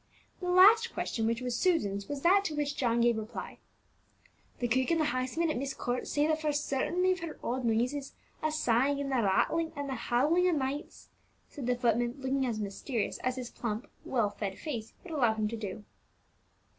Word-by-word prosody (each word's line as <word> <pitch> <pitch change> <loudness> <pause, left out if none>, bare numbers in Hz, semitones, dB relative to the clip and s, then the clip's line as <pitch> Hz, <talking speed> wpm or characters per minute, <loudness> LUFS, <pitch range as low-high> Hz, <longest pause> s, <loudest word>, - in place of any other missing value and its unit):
The 360 - -3
last 430 +6 +6
question, 225 -1 -1
which 230 +2 0
was 250 -1 -2
Susan's, 205 - +1
was 285 -1 -4
that 390 +3 +5
to 310 - -2
which 290 -1 -1
John 235 -5 +1
gave 235 -1 +3
reply. 220 +2 -7 1.0
"The 245 - -1
cook 255 +3 +1
and 335 -1 +2
the 310 - +2
housemaid 255 +6 0
at - - -2
Myst 270 +1 -3
Court 245 +1 -2
say 290 0 +1
that 315 0 +1
for 305 -1 +1
certain 295 +4 0
they've 370 0 +3
heard 330 -2 -6
odd 255 +2 -2
noises, 250 +5 0 0.3
a 310 - 0
sighing, 280 -1 +2
and 275 -1 -2
a - - +3
rattling, 320 +11 +1
and 285 -1 -4
a - - -2
howling 295 +10 +2
o' 360 - +3
nights," 285 0 -3 0.4
said 275 -6 -6
the 250 - +2
footman, 240 0 +1
looking 265 0 0
as 225 -3 -2
mysterious 210 +3 -3
as 255 0 -1
his 250 -2 -6
plump, 225 0 -4
well 225 -6 0
fed 200 -2 -4
face 235 -8 -5
would 345 - -8
allow 240 -7 +3
him 215 -1 0
to 230 - -4
do. 210 -2 -6
260 Hz, 200 wpm, -30 LUFS, 235-310 Hz, 1.0 s, last